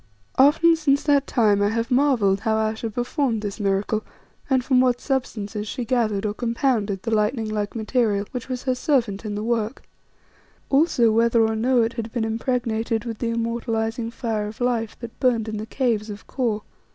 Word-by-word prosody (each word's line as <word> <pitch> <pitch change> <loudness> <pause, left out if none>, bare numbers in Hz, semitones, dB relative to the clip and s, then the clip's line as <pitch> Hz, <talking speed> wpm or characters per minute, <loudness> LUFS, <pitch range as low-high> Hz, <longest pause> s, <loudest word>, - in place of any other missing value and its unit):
Often 325 +5 +6
since 280 -3 +2
that 285 -2 +3
time 210 -5 +3
I 205 - +3
have 230 +3 -2
marvelled 245 -8 +3
how 220 +2 0
Ayesha 220 +1 -1
performed 240 0 -1
this 205 +1 -4
miracle, 205 +2 0 0.5
and 260 -2 +2
from 255 -2 +4
what 250 -1 +2
substances 215 -6 -3
she 245 +3 -4
gathered 220 -5 0
or 205 - -1
compounded 230 -4 -1
the 230 - -2
lightning 220 +2 +1
like 210 0 -3
material, 220 -2 0
which 250 0 -6
was 250 -1 -4
her 260 - +1
servant 245 -6 0
in 205 -1 -3
the 210 - -3
work; 230 +1 -1 0.9
also, 270 -6 +4
whether 230 0 +3
or 220 0 0
no 240 +2 +3
it 225 - -1
had 230 -1 -5
been 235 -2 -1
impregnated 225 -1 -1
with 230 -2 -5
the 235 - -1
immortalizing 230 0 -2
fire 225 -3 -3
of 215 - -9
Life 240 -3 -1
that 235 -1 -9
burned 240 -4 +2
in 215 -1 -3
the 215 +1 -5
caves 225 -4 -1
of 205 -1 -8
Kôr. 225 -5 -2
230 Hz, 185 wpm, -23 LUFS, 215-250 Hz, 0.9 s, Often